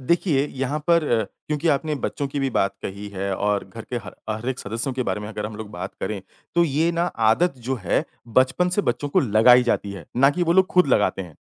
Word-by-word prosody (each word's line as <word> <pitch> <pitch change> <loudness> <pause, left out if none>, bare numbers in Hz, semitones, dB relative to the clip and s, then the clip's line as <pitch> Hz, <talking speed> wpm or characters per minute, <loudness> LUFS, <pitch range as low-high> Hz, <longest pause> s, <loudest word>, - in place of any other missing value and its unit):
देखिए 150 0 +1
यहाँ 135 +1 -3
पर 170 -2 +4 0.2
अ, 110 - -1 0.2
क्योंकि 150 +2 -1
आपने 150 +2 +1
बच्चों 140 - -2
की 140 +1 -3
भी 135 -1 0
बात 100 0 +1
कही 100 +1 -6
है 100 0 -2
और 105 0 0
घर 115 - -6
के - - 0
ह 90 - -7 0.2
हर 110 +3 -3
एक 130 0 -2
सदस्यों 115 +6 -3
के 130 - -1
बारे 100 -3 -2
में 105 - -6
अगर 105 -1 -4
हम 105 -1 -8
लोग 110 -2 -7
बात 105 - -6
करें, 105 -2 -3 0.3
तो 170 0 +5
ये 160 +2 +1
ना 170 0 +1 0.3
आदत 175 +9 +2
जो 135 - +1
है - - +1 0.3
बचपन 130 +8 +2
से 205 - +3
बच्चों 145 - -1
को - - +3
लगाई 120 +2 +6
जाती 105 -4 -1
है, 90 -6 -9
ना 135 +3 +6
कि 175 +4 -1
वो 170 -1 +3
लोग 190 +1 +5
खुद 180 -3 +5
लगाते 105 -6 +2
हैं, 85 -4 -12
130 Hz, 245 wpm, -23 LUFS, 105-150 Hz, 0.3 s, लगाई